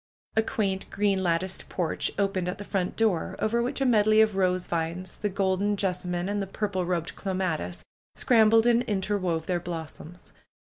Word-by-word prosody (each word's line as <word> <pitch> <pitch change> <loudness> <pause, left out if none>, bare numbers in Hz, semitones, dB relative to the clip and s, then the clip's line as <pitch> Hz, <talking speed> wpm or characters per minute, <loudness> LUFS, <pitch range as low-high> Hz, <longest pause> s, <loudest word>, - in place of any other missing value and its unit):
A 220 - +5
quaint, 195 -3 -2
green 200 -1 +1
latticed 185 +1 -1
porch 175 -4 -1
opened 195 -3 0
at 180 - -3
the 205 - -7
front 195 -3 -2
door, 215 -7 +1
over 235 +2 +1
which 245 +3 -2
a - - +3
medley 215 -3 +4
of 215 -2 +4
rose 185 -1 +1
vines, 170 +2 -3
the 210 - -1
golden 195 +1 0
jessamine, 180 -2 -1
and 205 0 -1
the 195 - -3
purple 190 -3 -2
robed 170 -2 -2
clematis, 185 - -3 0.3
scram 225 -3 +4
bled 225 +1 +5
and 240 0 +4
interwove 190 -5 -1
their 180 0 0
blossoms. 165 0 -8
190 Hz, 175 wpm, -27 LUFS, 180-210 Hz, 0.3 s, A